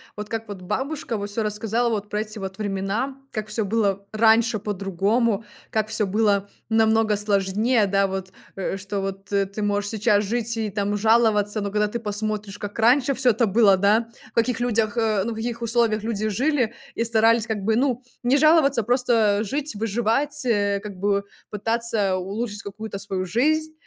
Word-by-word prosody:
вот 210 0 -7
как 225 0 -4
вот 200 -3 -8
бабушка 265 - -3
вот 205 0 -4
всё 220 +2 -2
рассказала 220 +3 -1
вот 210 -2 -3
про 210 0 -1
эти 215 0 -7
вот 190 -1 -6
времена. 205 +6 -2
Как 215 -1 -4
всё 215 0 -1
было 200 -2 0
раньше 225 0 +4
по-другому. 205 +3 0 0.3
Как 215 -1 -1
всё 210 - +1
было 200 0 +1 0.2
намного 220 -1 +3
сложнее. 210 +3 +2
Да 195 0 +2
вот 190 -1 -5 0.2
э, 195 0 -3
что, 195 +1 -4
вот, 195 0 -6
э, 200 0 +3
ты 200 +2 -7
можешь 205 0 0
сейчас 210 -1 +2
жить 230 +2 -2
и 220 -2 -2
там 205 0 -1
жаловаться, 215 -1 +3
но 200 -1 -2
когда 210 0 +1
ты 235 - -3
посмотришь, 210 -1 -3
как 205 +2 -7
раньше 250 +4 +4
всё 255 -1 +3
это 230 +2 +1
было, 205 -1 +5
да, 210 +4 +2 0.2
в - - -47
каких 235 +1 +1
людях 225 -3 0
э, 215 -4 +1
ну, 235 - -2
в - - -9
каких 235 +1 -4
условиях 230 -2 +1
люди 215 -1 -1
жили 250 +1 +1 0.2
и 230 - 0
старались 225 0 +3
как 220 -2 -2
бы, 220 +2 +2
ну, 255 0 0 0.2
не 250 +3 +3
жаловаться, 290 -5 +4
просто 230 -3 +2
жить, 280 +3 -3
выживать, 235 +7 -1
э, 205 -4 +1
как 210 -1 -7
бы 200 +1 0 0.2
пытаться 220 -2 0
улучшить 205 +3 -4
какую-то 200 0 -7
свою 195 -2 -3
жизнь. 310 - +1
215 Hz, 185 wpm, -23 LUFS, 200-230 Hz, 0.3 s, было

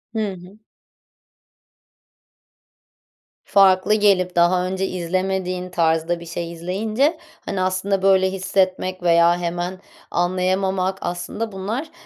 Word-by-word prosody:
Hı 215 -2 -1
hı. 185 +3 -14 2.9
Farklı 195 0 +4
gelip 195 -4 +2
daha 180 +1 +3
önce 190 +1 -2
izlemediğin 185 +1 -2
tarzda 165 0 +1
bir 170 - -10
şey 170 0 -5
izleyince, 215 - -1 0.3
hani, 195 -2 -2
aslında 185 +1 0
böyle 190 -1 +4
hissetmek 185 -1 -1
veya 170 0 +4
hemen 175 +1 -3 0.3
anlayamamak, 185 +1 0
aslında 175 +6 -4
bunlar, 220 +11 -4
185 Hz, 100 wpm, -21 LUFS, 175-195 Hz, 2.9 s, Farklı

